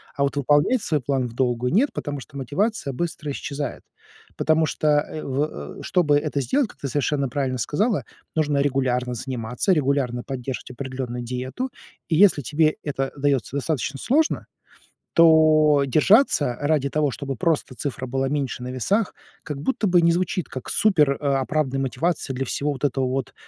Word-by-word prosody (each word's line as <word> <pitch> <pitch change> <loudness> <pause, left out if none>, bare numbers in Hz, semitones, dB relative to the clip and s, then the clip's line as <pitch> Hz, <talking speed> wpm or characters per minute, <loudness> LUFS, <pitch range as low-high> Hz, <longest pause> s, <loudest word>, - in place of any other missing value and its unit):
А - - -3
вот 140 - 0
выполнять 145 - +3
свой 150 -4 0
план 135 0 0
вдолгую- 125 +1 -1
нет, 255 +9 +4
потому 145 -2 -4
что 140 +1 -11
мотивация 145 - -1
быстро 155 0 -3
исчезает. 140 -1 -4 0.6
Потому 160 +1 +3
что, 155 - -2
э, 155 +1 -5
в 135 - -3
чтобы 155 -6 +3
это 145 -1 -1
сделать, 265 - +1
как - - -17
ты 140 - -3
совершенно 140 0 0
правильно 130 0 -1
сказала, 200 - 0 0.3
нужно 150 -2 +1
регулярно 130 -3 0
заниматься, 125 - -1
регулярно 135 -5 0
поддерживать 130 -1 -5
определенную 130 -1 -5
диету. 130 - -4 0.4
И 165 - +2
если 185 -3 +5
тебе 155 +3 +2
это 135 -2 -2
дается 140 -2 0
достаточно 140 -1 -2
сложно, 310 +5 +1 0.7
то 155 -3 +6
держаться 155 - +4
ради 145 -2 +1
того, 150 -1 +1
чтобы 135 +1 -5
просто 150 +1 0
цифра 135 -1 -4
была 135 +1 -1
меньше 140 -3 -2
на - - -5
весах, 190 - 0 0.3
как 145 -2 -5
будто 215 - 0
бы 175 -1 +4
не 170 - +5
звучит 180 0 -1
как 130 - -7
супероправданная 140 -5 +1
мотивация 145 +1 -1
для 135 +1 -2
всего 145 +4 -1
вот 130 - -10
этого 135 -1 0
вот, 130 0 -3
140 Hz, 160 wpm, -23 LUFS, 130-155 Hz, 0.7 s, то